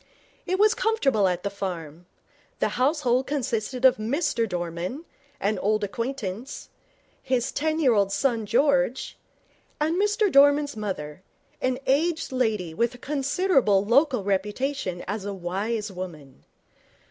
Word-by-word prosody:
It 370 - +1
was 425 +2 +5
comfortable 275 - +2
at 180 -1 -1
the 200 - -2
farm. 175 -4 -6 0.5
The - - +1
household 255 -1 +1
consisted 250 -2 -1
of 260 - +6
Mr 230 0 0
Dorman, 175 - -4 0.3
an 205 0 0
old 215 +2 +1
acquaintance, 230 +1 -4 0.5
his 255 0 0
ten 315 +1 -1
year 265 -6 +4
old 200 -2 +2
son 230 -3 0
George, 270 0 +1 0.6
and 315 +3 +1
Mr 415 -1 +2
Dorman's 285 +1 +5
mother, 185 -7 -5 0.4
an 255 0 0
aged 315 +4 +1
lady 220 -10 -1
with 235 +7 0
a - - -11
considerable 275 - +1
local 250 0 +3
reputation 200 0 -2
as 205 +1 -3
a 200 0 -4
wise 200 +4 -3
woman. 170 -7 -9
235 Hz, 130 wpm, -25 LUFS, 195-280 Hz, 0.6 s, of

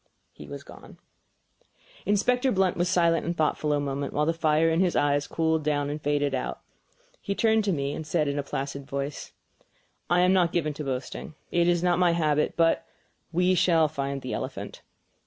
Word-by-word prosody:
He - - -12
was - - -8
gone. - - -14 1.1
Inspector 250 +6 +2
Blunt 190 -2 +2
was 175 0 0
silent 170 -2 +3
and 170 +1 -3
thoughtful 155 -1 0
a 145 - +2
moment, 140 0 -3
while 150 - +1
the 165 - +1
fire 160 0 +2
in 165 0 +2
his 180 -2 +2
eye 145 0 +3
cooled 160 -1 0
down 145 -1 0
and 150 +1 -5
faded 145 -1 0
out. 130 - -3
Then - - -37
he 200 - -3
turned 220 0 +3
to 200 - +1
me 140 -4 -1
and - - -5
said 155 -2 +1
in 140 0 -1
a - - +1
placid 140 0 -5
voice: 140 +1 -4 0.8
"I 175 0 +4
am 180 +1 +4
not 175 -3 +3
given 155 -3 0
to 150 - -6
boasting, 135 +3 -5 0.2
it 170 0 +2
is 175 0 +2
not 175 -1 +2
my 175 -2 +4
habit; 150 -3 +1
but 165 -1 +3 0.5
we 180 +2 +2
shall 170 -3 +4
find 140 -2 -4
the 130 - -4
elephant." - - -5
160 Hz, 195 wpm, -26 LUFS, 145-175 Hz, 1.1 s, I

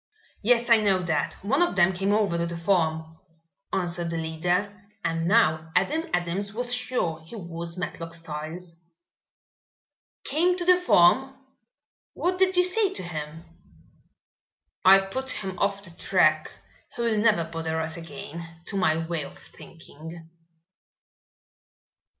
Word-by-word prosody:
"Yes, 235 +2 +3
I 230 - +9
know 195 -3 +2
that. 170 -2 -1
One 270 - +1
of 350 - +2
them 190 0 +4
came 195 +3 0
over 205 -4 +2
to 170 0 -1
the 170 0 -5
farm," 160 -3 0 0.5
answered 175 -2 -2
the 165 - -3
leader, 180 +5 -2 0.2
and 165 0 -1
now 160 -7 +3
Adam 320 +2 +1
Adams 180 +4 -2
was 245 +1 0
sure 245 -10 -1
he 165 - -11
was 170 -3 -5
Matlock 165 -2 -5
Styles. 165 +2 -6 1.4
"Came 350 +5 +1
to 350 - -2
the 365 0 +7
farm? 265 - +4 0.8
What 365 +1 -1
did 375 -1 +3
you 360 - +6
say 390 +2 +2
to 385 - -3
him?" 160 -1 -6 1.4
"I 190 +1 +9
put 225 +8 -3
him 190 -2 -5
off 200 0 0
the 170 - -10
track. 155 -3 +2 0.5
He 235 - -2
will 225 -2 +1
never 210 -6 +3
bother 160 0 -3
us 160 0 -2
again, 165 0 -8 0.3
to 200 - -3
my 160 -4 +2
way 165 -2 -2
of - - -11
thinking." 165 +1 -12
175 Hz, 140 wpm, -26 LUFS, 165-220 Hz, 1.4 s, I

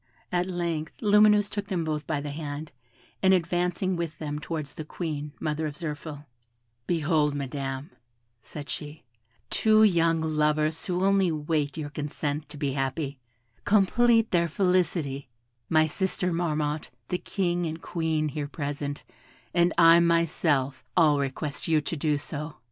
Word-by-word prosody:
At 180 0 +1
length, 170 -3 -3
Lumineuse 210 -1 +5
took 205 -1 -4
them 185 -5 -1
both 155 -1 -3
by 150 -3 -1
the 145 0 -5
hand, 150 0 -5 0.5
and 190 0 +6
advancing 180 +2 0
with 170 -2 -3
them 150 -1 -4
towards 150 -2 -5
the 155 - -6
Queen, 150 -2 -4
mother 155 0 -1
of 145 - -6
Zirphil: 150 -2 -6 0.6
"Behold, 155 -3 +2
Madam," 135 +2 -4 0.5
said 145 +5 -8
she, 150 0 -6 0.5
"two 215 0 +5
young 165 -5 +4
lovers 155 0 +1
who 180 0 0
only 195 -3 +3
wait 150 -1 -1
your 145 -2 -4
consent 150 0 -3
to 150 - -8
be 140 -2 -1
happy: 135 +1 -2 0.4
complete 225 +3 +4
their 170 -1 +3
felicity; 165 -7 0 0.4
my 155 -1 +5
sister 180 +2 -1
Marmotte, 155 -3 -1 0.2
the 180 - -1
King 175 -3 -1
and 160 +1 -5
Queen, 160 -1 -1
here 145 0 -4
present, 145 -1 -4 0.5
and 175 0 +4
I 165 0 +8
myself, 165 -5 +1
all 150 -4 +5
request 140 +1 -3
you 160 -2 +4
to 150 +3 -3
do 150 -1 +1
so." 150 +1 -6
155 Hz, 145 wpm, -27 LUFS, 145-175 Hz, 0.6 s, I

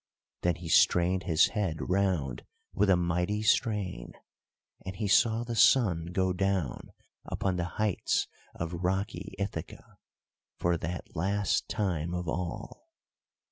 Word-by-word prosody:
Then 90 -1 +1
he 85 0 -9
strained 90 +3 +3
his 80 -4 +4
head 100 -8 -1
round 90 -10 0 0.3
with 100 0 +2
a 95 - +6
mighty 90 +4 0
strain, 105 - 0 0.7
and 95 0 -6
he 105 +2 -2
saw 115 +3 +3
the 120 -1 -4
sun 95 -10 +4
go 95 +1 0
down 95 -7 -1 0.3
upon 95 -2 -1
the 85 - -1
heights 105 -3 0 0.3
of 85 +1 -4
rocky 95 +4 -2
Ithaca, 95 -5 -6 0.6
for 85 0 +1
that 90 +3 -6
last 100 +4 0
time 90 -6 -1
of 90 0 -4
all. 85 +2 -5
90 Hz, 130 wpm, -29 LUFS, 85-100 Hz, 0.7 s, a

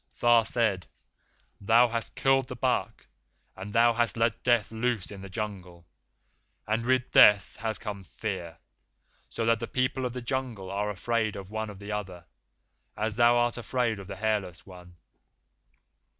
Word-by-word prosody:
Tha 120 -1 +5
said, 105 -7 +1 0.7
'Thou 115 +4 +5
hast 115 0 -3
killed 135 -1 +2
the - - -6
buck, - - -1 0.5
and 95 +2 -8
thou 115 +2 +4
hast 120 0 0
let 115 0 0
Death 120 -4 +2
loose 115 -3 -2
in 100 -2 -9
the 100 - -9
Jungle, 95 -4 -6 0.8
and 110 +2 -1
with 130 +1 +1
Death 100 -3 +6
has 110 -1 -2
come 105 -3 -6
Fear, 90 -4 -6 0.7
so 115 - -3
that 115 0 +3
the 115 - -4
people 130 +1 -1
of 120 - -8
the 125 - -5
Jungle 120 -7 -3
are 105 +1 -1
afraid 110 +2 -1
one 105 +3 -5
of 105 - -10
the 100 +2 -8
other, 95 -5 -5 0.7
as 110 0 -2
thou 120 0 +5
art 120 0 +1
afraid 120 -3 -1
of 95 - -10
the 100 - -6
Hairless 95 -4 -2
One. 90 -2 -14
110 Hz, 160 wpm, -28 LUFS, 100-120 Hz, 0.8 s, Death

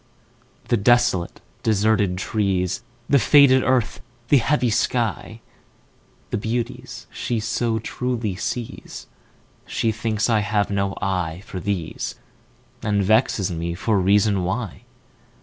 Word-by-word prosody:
The 120 - +3
desolate, 110 -5 +2 0.2
deserted 105 -3 +2
trees, 95 -2 -1 0.3
The 140 - +4
faded 130 +2 +6
earth, 130 -4 0 0.3
the 140 - +6
heavy 125 -1 +1
sky, 115 -1 -1 0.9
The - - -1
beauties 115 +2 -4
she 120 -2 -2
so 115 +1 -1
truly 115 -2 -3
sees, 120 +4 -5 0.6
She 115 - 0
thinks 110 -1 -1
I 115 -3 +3
have 105 0 0
no 100 0 -1
eye 90 -2 -2
for 95 - -6
these, 95 -4 -3 0.7
And 105 -1 +1
vexes 105 -2 +2
me 85 0 -3
for 105 +3 +1
reason 100 0 +3
why. 105 +2 -4
110 Hz, 115 wpm, -22 LUFS, 95-120 Hz, 0.9 s, faded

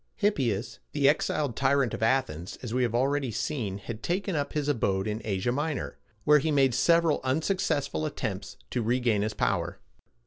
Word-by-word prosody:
Hippias, 130 - 0
the 145 -2 +3
exiled 145 -3 +1
tyrant 135 -2 +2
of - - -4
Athens, 110 - 0
as 120 -2 -4
we 130 - +1
have 120 -2 +1
already 135 +2 +1
seen, 115 -3 -2
had 110 +3 -7
taken 185 - -1
up 145 -1 -2
his 150 -2 -1
abode 100 -9 +1
in 105 +1 -2
Asia 100 +2 -1
Minor, 150 +2 -3 0.2
where 150 +4 +6
he 155 - -1
made 135 -4 +3
several 165 +3 +3
unsuccessful 145 - 0
attempts - - -4
to 120 - 0
regain 115 -2 +1
his 110 +1 -2
power. - - 0
130 Hz, 170 wpm, -28 LUFS, 110-150 Hz, 0.2 s, where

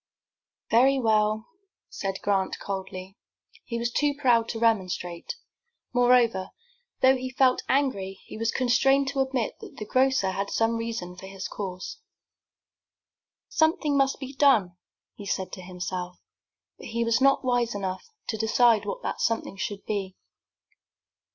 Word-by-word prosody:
"Very 265 +4 +5
well," 215 -2 +2 0.4
said 195 -1 -4
Grant, 195 -2 +1
coldly. 190 0 -6 0.5
He 235 - -3
was 235 +1 -1
too 290 +3 +1
proud 240 -5 +3
to 230 - -3
remonstrate. 185 - 0 0.6
Moreover, 245 -6 +3 0.5
though 265 0 +6
he 255 0 -4
felt 255 -1 +3
angry, 200 -9 0
he - - -10
was 225 +1 -1
constrained 270 +3 +3
to 275 -1 -3
admit 265 -4 -1
that - - -11
the 215 - -5
grocer 255 -4 +2
had 200 +1 -3
some 225 0 +1
reason 230 -6 -4
for 190 - -10
his 195 0 -6
course. 190 - -6 1.5
"Something 315 -2 +2
must 275 -1 +2
be 265 0 -7
done," 245 -11 +4 0.4
he 205 - -10
said 190 -1 -2
to 185 - -7
himself, 180 0 -5 0.6
but - - -9
he 235 0 -1
was 230 +2 +2
not 275 0 +4
wise 245 -3 +1
enough 190 -2 -4 0.2
to 220 - -1
decide 225 0 +3
what - - -4
that - - -3
something 230 -3 0
should 200 +1 -5
be. 195 -3 -3
230 Hz, 145 wpm, -26 LUFS, 195-260 Hz, 1.5 s, though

